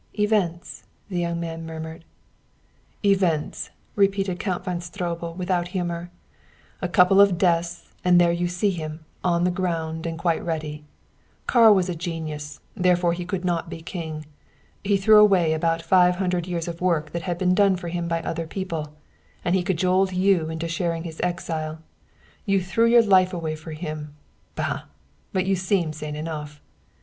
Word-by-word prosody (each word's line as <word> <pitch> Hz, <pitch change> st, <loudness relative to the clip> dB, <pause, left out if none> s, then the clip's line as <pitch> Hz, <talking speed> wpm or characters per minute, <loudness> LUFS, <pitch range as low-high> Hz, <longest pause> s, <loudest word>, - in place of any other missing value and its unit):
"Events!" 205 Hz, -5 st, 0 dB, 0.3 s
the 180 Hz, -3 st, -2 dB
young 170 Hz, -1 st, -1 dB
man 165 Hz, -1 st, -5 dB
murmured. 160 Hz, 0 st, -7 dB, 1.0 s
"Events!" 185 Hz, -6 st, +1 dB, 0.3 s
repeated 195 Hz, -2 st, +1 dB
Count 185 Hz, -3 st, -2 dB
von 180 Hz, -1 st, -2 dB
Stroebel 170 Hz, -2 st, -4 dB
without 180 Hz, -1 st, -1 dB
humor. 175 Hz, -1 st, -3 dB, 0.7 s
"A -, -, 0 dB
couple 195 Hz, 0 st, +6 dB
of 200 Hz, -3 st, +5 dB
deaths 170 Hz, -1 st, +1 dB, 0.2 s
and 180 Hz, -1 st, +5 dB
there 175 Hz, -1 st, +5 dB
you 175 Hz, +1 st, 0 dB
see 180 Hz, +3 st, 0 dB
him, 155 Hz, -2 st, -6 dB, 0.2 s
on 175 Hz, -1 st, +2 dB
the 180 Hz, -, +2 dB
ground 165 Hz, -3 st, -2 dB
and 165 Hz, -1 st, -4 dB
quite 165 Hz, -1 st, 0 dB
ready. 155 Hz, -2 st, -4 dB, 0.6 s
Karl 225 Hz, -4 st, +6 dB
was 185 Hz, -2 st, +1 dB
a 180 Hz, -, -2 dB
genius, 155 Hz, -3 st, -5 dB, 0.2 s
therefore 180 Hz, -3 st, +3 dB
he 175 Hz, 0 st, -4 dB
could 180 Hz, 0 st, -3 dB
not 170 Hz, -2 st, -1 dB
be 165 Hz, -, -8 dB
king. 160 Hz, -3 st, -6 dB, 0.6 s
He 200 Hz, 0 st, +2 dB
threw 210 Hz, +2 st, +6 dB
away 190 Hz, -6 st, +5 dB
about 165 Hz, +1 st, 0 dB
five 180 Hz, +1 st, +4 dB
hundred 180 Hz, -2 st, -1 dB
years 170 Hz, -2 st, -3 dB
of 170 Hz, 0 st, -6 dB
work 170 Hz, -4 st, +1 dB
that 170 Hz, -, -3 dB
had 175 Hz, -1 st, -3 dB
been 180 Hz, 0 st, +2 dB
done 195 Hz, 0 st, +4 dB
for 175 Hz, -1 st, -5 dB
him 170 Hz, 0 st, -3 dB
by 165 Hz, -1 st, -1 dB
other 165 Hz, 0 st, -3 dB
people 160 Hz, -5 st, -4 dB, 0.5 s
and 175 Hz, -, +2 dB
he 190 Hz, -, +3 dB
cajoled 185 Hz, +1 st, +1 dB
you 180 Hz, -3 st, +2 dB
into 160 Hz, +1 st, -3 dB
sharing 165 Hz, 0 st, -2 dB
his 165 Hz, -2 st, -7 dB
exile. 160 Hz, -3 st, -2 dB, 0.7 s
You 195 Hz, -1 st, +3 dB
threw 190 Hz, +5 st, +2 dB
away 230 Hz, -, +3 dB
your 235 Hz, -1 st, +8 dB
life 190 Hz, -3 st, +5 dB, 0.3 s
for 160 Hz, +1 st, -9 dB
him! 155 Hz, -2 st, -6 dB, 0.4 s
Bah! -, -, -2 dB, 0.5 s
But 185 Hz, -1 st, 0 dB
you 195 Hz, 0 st, +2 dB
seem 180 Hz, -3 st, 0 dB
sane 150 Hz, -1 st, -6 dB
enough!" 150 Hz, -1 st, -6 dB
175 Hz, 170 wpm, -24 LUFS, 165-185 Hz, 1.0 s, your